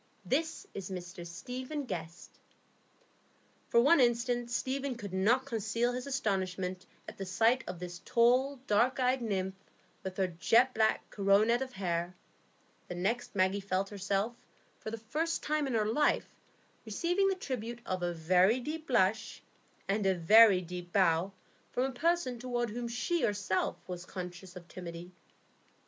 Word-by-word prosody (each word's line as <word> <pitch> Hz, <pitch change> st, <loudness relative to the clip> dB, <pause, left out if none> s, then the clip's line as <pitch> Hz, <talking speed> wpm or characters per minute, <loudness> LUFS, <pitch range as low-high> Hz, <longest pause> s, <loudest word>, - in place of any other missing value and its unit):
"This 320 Hz, +4 st, -1 dB
is 195 Hz, -1 st, -6 dB
Mr 180 Hz, -1 st, -7 dB
Stephen 255 Hz, -, -5 dB
Guest." 170 Hz, -5 st, -7 dB, 1.3 s
For 235 Hz, -, +5 dB
one 285 Hz, +7 st, +6 dB
instant 240 Hz, 0 st, +2 dB
Stephen 265 Hz, +2 st, -2 dB
could 205 Hz, -5 st, -8 dB
not 225 Hz, +8 st, +3 dB
conceal 230 Hz, 0 st, -1 dB
his 250 Hz, +2 st, -4 dB
astonishment 185 Hz, -8 st, -2 dB, 0.2 s
at -, -, -10 dB
the 195 Hz, -, -3 dB
sight 225 Hz, +7 st, +3 dB
of 180 Hz, -, -5 dB
this 175 Hz, 0 st, -7 dB
tall, 250 Hz, +4 st, +3 dB
dark 240 Hz, +5 st, +2 dB
eyed 255 Hz, 0 st, +2 dB
nymph 190 Hz, -4 st, -1 dB, 0.5 s
with 190 Hz, -1 st, -6 dB
her 190 Hz, -, +2 dB
jet 230 Hz, +9 st, +3 dB
black 220 Hz, 0 st, +1 dB
coronet 210 Hz, +4 st, +3 dB
of 260 Hz, -1 st, -4 dB
hair; 175 Hz, -1 st, -2 dB, 0.7 s
the 180 Hz, -, -5 dB
next, 215 Hz, +6 st, -2 dB
Maggie 190 Hz, +1 st, +2 dB
felt 195 Hz, 0 st, -1 dB
herself, 200 Hz, +3 st, -1 dB, 0.4 s
for -, -, -6 dB
the 225 Hz, -, -4 dB
first 305 Hz, +10 st, -2 dB
time 300 Hz, -1 st, 0 dB
in 255 Hz, -, -1 dB
her 215 Hz, -1 st, +2 dB
life, 285 Hz, +8 st, +1 dB, 0.5 s
receiving 345 Hz, -, +1 dB
the 385 Hz, -, +1 dB
tribute 240 Hz, -, -5 dB
of 185 Hz, -1 st, -2 dB
a 175 Hz, 0 st, 0 dB
very 180 Hz, +7 st, +3 dB
deep 310 Hz, +5 st, -5 dB
blush 220 Hz, -3 st, +1 dB, 0.4 s
and 200 Hz, 0 st, +1 dB
a 190 Hz, -, +3 dB
very 200 Hz, +3 st, +7 dB
deep 175 Hz, 0 st, -7 dB
bow 185 Hz, -1 st, +3 dB, 0.4 s
from 250 Hz, -, +1 dB
a 270 Hz, -, -1 dB
person 285 Hz, -2 st, 0 dB
toward 240 Hz, -2 st, -2 dB
whom 240 Hz, +2 st, -4 dB
she 315 Hz, +8 st, -1 dB
herself 200 Hz, -3 st, 0 dB
was 180 Hz, -1 st, -6 dB
conscious 180 Hz, 0 st, -8 dB
of 175 Hz, -1 st, -10 dB
timidity. 175 Hz, 0 st, -8 dB
215 Hz, 155 wpm, -32 LUFS, 185-250 Hz, 1.3 s, very